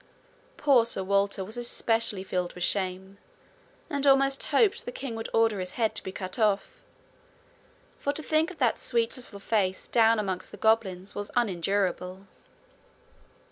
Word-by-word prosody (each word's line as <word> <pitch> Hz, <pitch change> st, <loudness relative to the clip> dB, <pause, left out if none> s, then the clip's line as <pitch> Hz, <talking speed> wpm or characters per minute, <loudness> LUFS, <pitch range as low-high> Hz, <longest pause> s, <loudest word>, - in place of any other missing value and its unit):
Poor 275 Hz, -5 st, +5 dB
Sir 230 Hz, -4 st, -2 dB
Walter 200 Hz, 0 st, +1 dB
was 215 Hz, +5 st, -8 dB
especially 225 Hz, -4 st, 0 dB
filled 180 Hz, -2 st, -2 dB
with 180 Hz, -, -5 dB
shame, 190 Hz, 0 st, -2 dB, 0.7 s
and 285 Hz, -1 st, -1 dB
almost 275 Hz, 0 st, +4 dB
hoped 465 Hz, +2 st, +2 dB
the -, -, -4 dB
king 275 Hz, -, -6 dB
would 225 Hz, 0 st, -5 dB
order 225 Hz, -3 st, +2 dB
his 185 Hz, 0 st, -5 dB
head 225 Hz, -3 st, 0 dB
to -, -, -5 dB
be 190 Hz, -, -6 dB
cut 185 Hz, +3 st, -6 dB
off, 215 Hz, -, 0 dB, 1.2 s
for 285 Hz, -, 0 dB
to 315 Hz, -, -6 dB
think 315 Hz, +2 st, +1 dB
of 370 Hz, -, -11 dB
that 245 Hz, -5 st, +1 dB
sweet 235 Hz, -2 st, +1 dB
little 240 Hz, -5 st, -7 dB
face 195 Hz, -2 st, -1 dB
down 225 Hz, -1 st, +4 dB
amongst 190 Hz, -3 st, -3 dB
the -, -, -11 dB
goblins 205 Hz, -3 st, +1 dB
was 205 Hz, 0 st, -5 dB
unendurable. 190 Hz, -3 st, -1 dB
215 Hz, 155 wpm, -27 LUFS, 190-245 Hz, 1.2 s, Poor